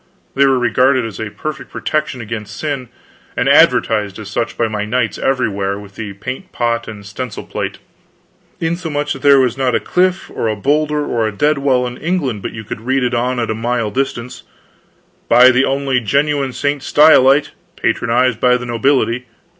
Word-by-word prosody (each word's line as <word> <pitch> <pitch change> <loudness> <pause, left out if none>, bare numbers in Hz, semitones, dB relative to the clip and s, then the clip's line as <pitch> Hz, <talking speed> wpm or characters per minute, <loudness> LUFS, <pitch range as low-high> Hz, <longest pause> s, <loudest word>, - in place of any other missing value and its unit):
They 140 0 +4
were 135 -1 +3
regarded 125 +1 +2
as 110 -3 -7
a 110 -1 -4
perfect 155 +8 -6
protection 155 -4 -2
against 110 -1 -6
sin, 140 -5 -4 0.5
and - - +1
advertised 105 -3 +3
as 105 -2 -8
such 115 +2 -2
by 115 - +1
my 105 -1 -3
knights 115 +1 -1
everywhere, 100 -7 0
with 100 -1 -12
the 105 -1 -6
paint 130 - -7
pot 115 -1 -1
and 105 -2 -9
stencil 105 +3 -6
plate; - - -4 0.8
insomuch 160 -3 -2
that 135 - -9
there 140 -1 +6
was 130 0 +1
not 130 -2 +1
a - - +2
cliff 185 +1 0
or - - -2
a 110 - 0
bowlder 150 +6 0
or 115 -2 0
a - - -2
dead 145 +7 +1
wall 130 -2 +2
in 125 0 -6
England 150 - -2
but - - -5
you 110 - -8
could 110 - -7
read 130 +2 0
on 125 +1 0
it 120 - 0
at 115 - -2
a - - 0
mile 115 -1 -2
distance: 125 -1 -3 0.9
"Buy 125 +1 +7
the 130 +1 +3
only 135 -1 0
genuine 140 +3 0
St. 145 +3 -2
Stylite; 145 -1 +5 0.2
patronized 125 -1 +1
by 125 0 +4
the 125 - -7
Nobility. 120 0 0
125 Hz, 185 wpm, -17 LUFS, 115-140 Hz, 0.9 s, Buy